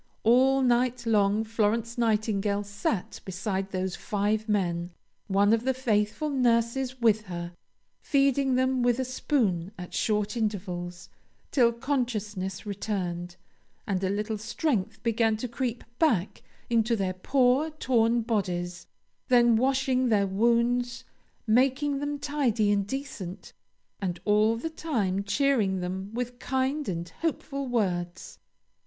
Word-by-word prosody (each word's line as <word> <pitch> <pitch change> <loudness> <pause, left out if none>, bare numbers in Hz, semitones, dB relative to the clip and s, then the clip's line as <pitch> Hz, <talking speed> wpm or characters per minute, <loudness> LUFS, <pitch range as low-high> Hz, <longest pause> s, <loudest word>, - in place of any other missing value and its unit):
All 265 +4 +4
night 245 0 +2
long 210 -1 +3
Florence 225 +1 0
Nightingale 210 -3 +1
sat 205 -1 -3
beside 190 +1 -3
those 185 -1 -2
five 210 +2 -1
men, 175 -4 0 0.4
one 200 +1 +3
of 225 0 +1
the 265 0 +1
faithful 240 +4 0
nurses 250 0 +1
with 220 -2 +3
her, 175 -2 -5 0.5
feeding 275 -2 +2
them 260 0 +2
with 245 -1 +3
a 260 - -1
spoon 220 - 0
at 180 -1 -8
short 210 0 0
intervals 180 -5 -3 0.4
till 240 -4 +4
consciousness 220 -7 -3
returned, 180 -4 -3 0.5
and 190 -1 -1
a 190 - +1
little 210 +2 -2
strength 225 - -2
began 225 -1 +2
to 250 - -4
creep 235 0 -3 0.2
back 225 - +1 0.3
into 230 0 +2
their 190 -3 -1
poor 260 +9 +2
torn 240 -6 +1
bodies; 180 -6 -2 0.4
then 240 -2 +5
washing 260 +1 +2
their 205 -3 +3
wounds, 235 +4 +1 0.4
making 270 +5 +2
them 290 0 -2
tidy 275 -8 +1
and 200 -1 +1
decent, 245 -9 -6 0.5
and 180 -3 -2
all 215 +2 +4
the 325 +8 -4
time 210 - -1
cheering 205 -3 +1
them 185 +2 -4
with 245 +1 -4
kind 265 +2 -1
and 170 -1 -4
hopeful 280 -4 -2
words. 185 -7 -2
225 Hz, 125 wpm, -27 LUFS, 200-255 Hz, 0.5 s, then